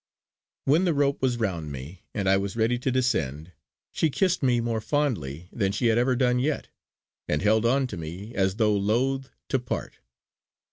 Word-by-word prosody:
When 155 +7 +4
the 170 -4 +2
rope 140 0 +1
was 125 -2 +1
round 85 -9 -2
me 70 +7 -8
and 100 -3 -2
I 95 - +5
was 100 +1 -2
ready 115 +2 +2
to 130 +1 0
descend, 80 - 0 0.4
she 160 - +1
kissed 185 +5 +1
me 125 -3 +3
more 115 -1 -1
fondly 90 - -1
than 100 -4 0
she 115 +3 +1
had 115 - +3
ever 125 +1 +2
done 125 -1 +2
yet, 145 +4 -1 0.6
and 75 +4 0
held 110 +2 +3
on 135 +3 +3
to 105 -7 -6
me 90 +8 -7
as 95 -2 +1
though 105 -1 +3
loth 125 +7 0 0.2
to 135 - +2
part. 125 - -5
115 Hz, 185 wpm, -26 LUFS, 95-130 Hz, 0.6 s, I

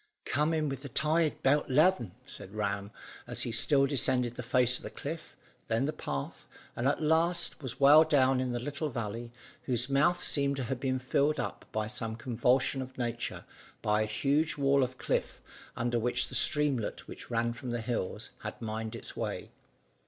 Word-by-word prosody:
"Come 150 +3 +1
in 155 -2 0
with 135 -1 -4
the 140 - -7
tide 155 +4 +1
'bout 145 +2 +3
'leven," 145 - +3
said 100 - -6
Ram, 100 -1 -2 0.4
as - - -3
he 120 - -3
still 135 +4 +4
descended 130 -3 +1
the 125 - -6
face 125 0 +3
of - - -12
the - - -5
cliff, 160 +3 -7 0.3
then 115 +4 +1
the 155 - -2
path, 70 -1 -5 0.3
and 120 - 0
at 145 +3 0
last 165 +2 +2
was 130 -3 -5
well 145 +3 +8
down 135 -4 +3
in 130 -1 -1
the 120 - -2
little 145 +4 -3
valley, 115 -1 -5 0.3
whose 125 +1 -1
mouth 150 +6 +3
seemed 140 -1 +1
to 135 - -3
have 125 +1 -3
been 130 -1 0
filled 140 +4 +1
up - - -4
in 110 0 -1
some 115 -1 -3
convulsion 125 +3 +1
of 130 0 -9
nature 120 -1 -3 0.4
by 105 0 +2
a - - +1
huge 145 +8 +1
wall 140 0 +3
of 130 0 -1
cliff, - - -2 0.4
under 120 0 0
which 125 +2 +2
the - - -10
streamlet 140 -3 +2
which - - -10
ran 120 0 0
from 120 +2 -7
the 120 -1 -2
hills 110 -2 -3
had - - -6
mined 110 0 -4
its - - -8
way. - - -4
130 Hz, 190 wpm, -30 LUFS, 115-145 Hz, 0.4 s, well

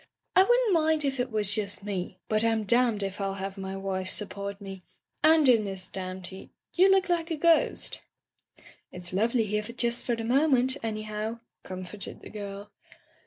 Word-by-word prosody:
"I 375 - +8
wouldn't 485 0 +3
mind 315 -2 +2
if 270 -1 -1
it 245 +1 0
was 210 -2 0
just 205 -2 -1
me, 195 -3 -4
but 215 0 +1
I'm 225 -1 +1
danmed 235 -1 +2
if 195 +1 -4
I'll 195 0 -2
have 195 0 -5
my 190 -1 -5
wife 190 -1 -3
support 200 -1 -4
me 195 -2 -8 0.2
— - - -48
^and 315 -2 +6
in 235 -4 +5
this 190 -2 -6
damned 185 -1 -6
heat 190 +2 -10 0.2
— - - -32
^you 375 +2 +6
look 385 0 +4
like 340 -2 0
a 330 - -1
ghost." 335 +2 +2 0.4
" - - -24
It's 180 -1 -2
lovely 225 +4 +2
here 210 +1 -1
just 235 +2 -1
for 240 - 0
the 230 - -5
moment, 260 +1 +4
any 215 -1 -3
how," 215 +2 -4 0.2
comforted 185 +2 -7
the - - -11
girl. 205 -1 -7
215 Hz, 195 wpm, -28 LUFS, 195-255 Hz, 0.4 s, I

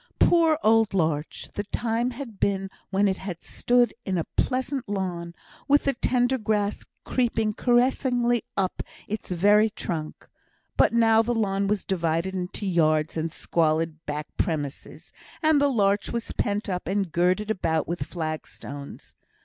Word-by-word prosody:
Poor 330 -3 +4
old 220 -2 +4
larch! 155 -4 -1
the 205 - -2
time 230 +3 -1
had 245 -4 -8
been 195 -1 0 0.2
when 200 +1 +2
it 190 -1 -1
had 180 -3 -6
stood 245 0 +2
in 190 -2 -1
a 165 - 0
pleasant 260 -2 -1
lawn, 175 -4 -3 0.3
with 285 +1 +4
the 275 - +1
tender 250 +1 +1
grass 210 -1 -1 0.2
creeping 225 -4 0
caressingly 245 0 +2
up 190 -2 0
to - - -4 0.2
its 215 +1 -5
very 205 +5 +4
trunk; 160 -6 -5 0.5
but - - +4
now 225 -1 +5
the 240 +1 -1
lawn 200 -3 0
was 205 -1 -1
divided 170 0 0
into 185 +2 -4
yards 155 -4 +2
and 160 0 -2
squalid 160 0 0
back 150 0 -3
premises, 150 -6 -3 0.3
and 310 -2 +4
the 285 - +4
larch 205 -5 +1
was 235 -1 -3
pent 205 +1 -1
up 180 -4 -3
and 195 -2 -1
girded 185 +6 +1
about 160 -6 0
with 170 +1 -3
flag 155 -3 -4
stones. 140 0 -10
200 Hz, 155 wpm, -25 LUFS, 170-235 Hz, 0.5 s, now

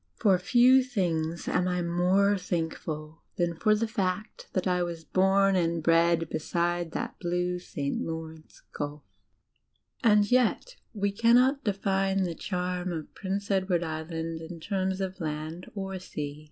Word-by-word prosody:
For 200 -4 +4
few 250 +7 +6
things 170 -9 -2
am 180 - +1
I 180 -1 0
more 180 +4 +3
thankful 160 -3 -4
than 175 -1 0
for 215 +6 +3
the 225 +2 0
fact 195 -2 -3
that 185 - 0
I 180 -1 +1
was 170 -2 -3
bom 195 +3 +3
and 170 -3 +1
bred 165 0 +3
beside 170 +2 -1
that - - -4
blue 180 0 -1
St. 145 -5 -3
Lawrence 160 -1 -7
Gulf. 145 0 -5 1.0
And 210 -1 +4
yet 255 - +2 0.2
we 200 -1 0
cannot 245 +6 +4
define 195 -1 +1
the 175 -2 -2
charm 180 0 -3
of 160 -3 -6
Prince 200 +1 -3
Edward 190 -3 +1
Island 160 0 -4
in 165 +1 -8
terms 190 +1 -1
of 190 0 -4
land 155 +3 -5
or 195 -1 -4
sea. 150 -5 -6
180 Hz, 145 wpm, -28 LUFS, 165-195 Hz, 1.0 s, few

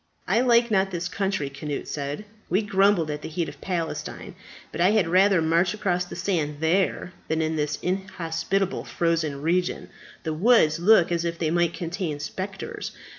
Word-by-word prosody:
"I 235 - +3
like 235 -2 +4
not 195 -2 +3
this 180 -1 -3
country," 190 -5 -1
Cnut 140 +1 -5
said. 145 +7 -4 0.2
"We 190 +5 +2
grumbled 195 -5 +3
at 150 0 -5
the - - -6
heat 165 +1 -2
of 145 -1 -10
Palestine, 170 -4 -4 0.4
but - - -4
I 180 - +5
had 210 -5 +3
rather 185 0 +4
march 170 +4 +2
across 180 -4 0
the - - -9
sand 170 -5 -1
there 175 +2 +1
than 160 0 0
in 160 0 0
this 150 -1 -1
inhospitable 190 0 -2
frozen 160 -4 -1
region. 175 +3 0 0.3
The 160 - -2
woods 165 -4 +4
look 180 -1 +5
as 170 -1 0
if 170 0 -2
they 160 -2 -1
might 170 0 +1
contain 170 -3 -3
spectres. 190 +6 -5
175 Hz, 175 wpm, -25 LUFS, 160-195 Hz, 0.4 s, I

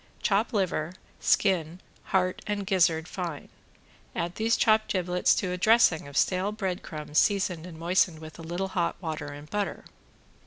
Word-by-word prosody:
Chop 210 +3 +2
liver, 185 -5 -1 0.2
skin, 175 -4 +2 0.3
heart 185 -1 0
and 205 -1 -2
gizzard 170 -4 +2
fine. 175 -6 -5 0.7
Add 170 +1 -2
these 225 +3 +1
chopped 215 0 +3
giblets 180 -1 +2
to 185 -3 -1
a 180 - -2
dressing 215 -8 +4
of 140 - -6
stale 190 +2 +2
bread 190 -4 -3
crumbs 150 -1 -2
seasoned 185 -4 +1
and 165 -3 -10
moistened 175 0 +2
with 155 0 -11
a - - -7
little 175 +4 -3
hot 170 -3 0
water 155 -4 -4
and 145 +1 -9
butter. 205 +3 -3
180 Hz, 160 wpm, -27 LUFS, 160-195 Hz, 0.7 s, dressing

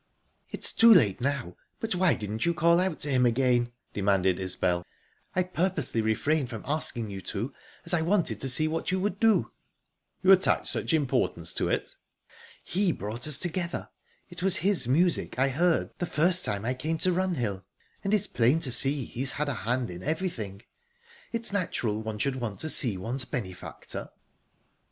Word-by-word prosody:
"It's - - +2
too 230 0 +7
late 120 - +5
now, 135 -9 -2 0.2
but 225 -2 -2
why 180 -2 +3
didn't 105 +1 -4
you 170 0 +1
call 170 0 +4
out 185 -3 -1
to 145 - 0
him 130 -1 +3
again?" 120 0 +2 0.2
demanded 95 -2 +1
Isbel. 90 -1 -1 0.5
"I 185 - +3
purposely 175 -9 -1
refrained 130 +6 0
from 115 -4 -7
asking 120 -7 -2
you 95 -1 -6
to, - - -5 0.3
as - - -1
I 170 - +2
wanted 165 - 0
to 135 - +2
see 155 +5 +6
what 165 +1 -2
you 185 - 0
would 195 0 -2
do." 225 -2 +3 0.7
"You 190 - +6
attach 190 -1 +3
such - - -2
importance 125 - 0
to - - -1
it?" - - -2 0.7
"He 190 0 0
brought 115 +1 -2
us 150 -4 +3
together. 175 -1 -3 0.4
It 175 -1 -8
was 190 0 +1
his 195 - +2
music 170 +5 +1
I 135 +2 +3
heard 165 +5 +1
the 175 - -2
first 175 +4 +2
time 100 +1 -2
I 125 - 0
came 155 +5 -3
to 185 +3 +1
Runhill, 130 - -1 0.4
and 195 - -1
it's 210 -3 +2
plain 125 +7 +2
to 135 -6 +2
see 135 +1 +4
he's 130 +4 0
had 150 0 -2
a - - -1
hand 120 +1 -2
in 90 0 -8
everything. 125 - -4 0.7
It's 230 -3 -2
natural 120 - -1
one 110 -1 -5
should 130 +4 -1
want 115 -5 -5
to 155 - -1
see 120 -8 +3
one's 120 +7 -3
benefactor." 95 -11 -7
135 Hz, 180 wpm, -27 LUFS, 110-175 Hz, 0.7 s, too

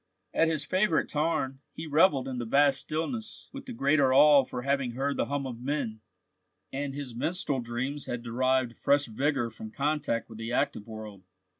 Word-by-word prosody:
At 165 - +3
his 155 -3 -1
favourite 185 -2 +2
tarn, 150 -4 -1 0.2
he 160 - -6
revelled 150 -3 +3
in 130 -2 -4
the 120 - -3
vast 140 +3 +4
stillness 215 +9 -4
with 275 -1 -8
the - - -5
greater 140 - +3
awe 145 +1 +7
for 125 -1 -5
having 140 -3 0
heard 140 +3 -1
the - - 0
hum 140 0 -2
of 120 -3 -6
men, 125 -5 -2 0.7
and 140 0 -3
his 140 -4 -6
minstrel 145 +2 -1
dreams 125 +4 -3
had 120 -1 -4
derived 130 +1 +1
fresh 145 0 +2
vigour 130 0 -1
from 110 0 -9
contact 145 -2 -1
with 110 -1 -11
the 115 +1 -4
active 110 -2 -1
world. 110 -3 -8
135 Hz, 180 wpm, -29 LUFS, 120-150 Hz, 0.7 s, awe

